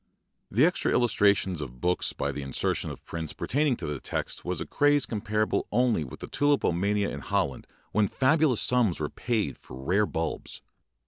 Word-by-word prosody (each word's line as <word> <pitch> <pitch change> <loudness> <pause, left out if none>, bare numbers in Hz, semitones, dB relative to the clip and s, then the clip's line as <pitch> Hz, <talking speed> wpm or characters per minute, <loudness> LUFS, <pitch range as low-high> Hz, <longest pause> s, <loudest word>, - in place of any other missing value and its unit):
The 120 +9 +4
extra 180 - +1
illustration 100 -7 +2
of 60 -3 -7
books 90 +6 +1
by - - -2
the 75 - -5
insertion 70 -1 -1
of - - -9
prints 80 -2 -4
pertaining 145 -1 +1
to - - -6
the 75 -2 -3
text - - -4
was - - -2
a - - -3
craze 145 -1 +3
comparable 110 0 -1
only 120 -6 +2
with 65 - -10
tulipomania 105 -8 +1
in 70 - -5
Holland 65 -1 -1 0.2
when 105 -1 +3
fabulous 135 0 +3
sums 120 -8 +2
were 75 - -2
spent 110 - -1
for - - -12
rare 95 +11 +1
bulbs. 80 -1 -4
105 Hz, 170 wpm, -27 LUFS, 80-125 Hz, 0.2 s, The